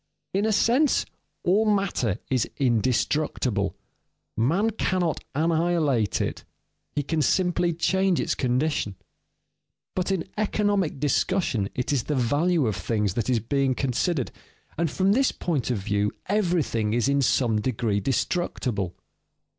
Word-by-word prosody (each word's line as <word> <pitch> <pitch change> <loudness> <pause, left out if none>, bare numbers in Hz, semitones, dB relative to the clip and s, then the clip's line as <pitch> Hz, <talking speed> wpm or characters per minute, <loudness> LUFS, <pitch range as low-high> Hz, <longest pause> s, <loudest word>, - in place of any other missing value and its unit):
In 200 +3 +1
a - - +2
sense, 245 +8 +3 0.4
all 195 +5 +3
matter 195 - 0
is 130 -2 0
indestructible. 125 -3 0 0.6
Man 170 - +2
cannot 185 -6 -1
annihilate 160 -7 +1
it, - - -3 0.5
he 145 - -2
can 155 +3 -1
simply 175 +3 +2
change 190 +2 +1
its - - 0
condition. 125 -5 0 1.0
But 185 +1 -1
in 185 -4 -1
economic 205 -7 0
discussion 145 - +1
it 125 +3 -1
is 130 -5 0
the 150 - -1
value 145 +6 +2
of 105 -4 -1
things 105 -5 -1
that 115 +1 -2
is 125 -3 +3
being 135 +3 0
considered, 135 +3 -1 0.4
and 165 0 0
from 190 +5 +1
this 265 +5 +3
point 150 -10 -2
of 125 - 0
view 105 +1 0
everything 170 - 0
is 120 +1 +1
in 140 0 +2
some 115 -4 +2
degree 110 -3 0
destructible. 120 - -1
145 Hz, 130 wpm, -25 LUFS, 120-180 Hz, 1.0 s, sense